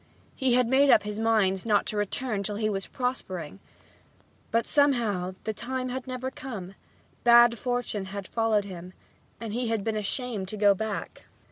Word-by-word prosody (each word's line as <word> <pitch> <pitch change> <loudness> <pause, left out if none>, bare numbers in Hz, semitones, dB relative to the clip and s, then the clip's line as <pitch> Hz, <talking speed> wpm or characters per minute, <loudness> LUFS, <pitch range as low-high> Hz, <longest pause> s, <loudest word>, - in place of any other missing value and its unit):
He 260 -3 +2
had 250 -1 +3
made 270 +3 +4
up 215 - +6
his 210 0 -4
mind 210 -4 +2
not 210 -3 +2
to - - -2
return 205 +1 -1
till 205 +1 -3
he 215 0 0
was 195 -1 -3
prospering. 195 - -4 0.9
But 230 0 +1
somehow 225 -11 +2
this 220 - -2
time 255 +4 -3
had 260 +1 -5
never 255 0 -4
come; 210 -10 -7 0.5
bad 235 -1 +6
fortune 245 -5 -2
had 195 0 -6
followed 225 -3 +1
him 180 -1 -9 0.5
and 225 -2 -5
he 245 +1 -1
had 225 -3 -1
been 220 0 -1
ashamed 215 -1 -2
to 215 - -4
go 205 -1 +5
back. 215 +1 -5
220 Hz, 170 wpm, -27 LUFS, 200-245 Hz, 0.9 s, up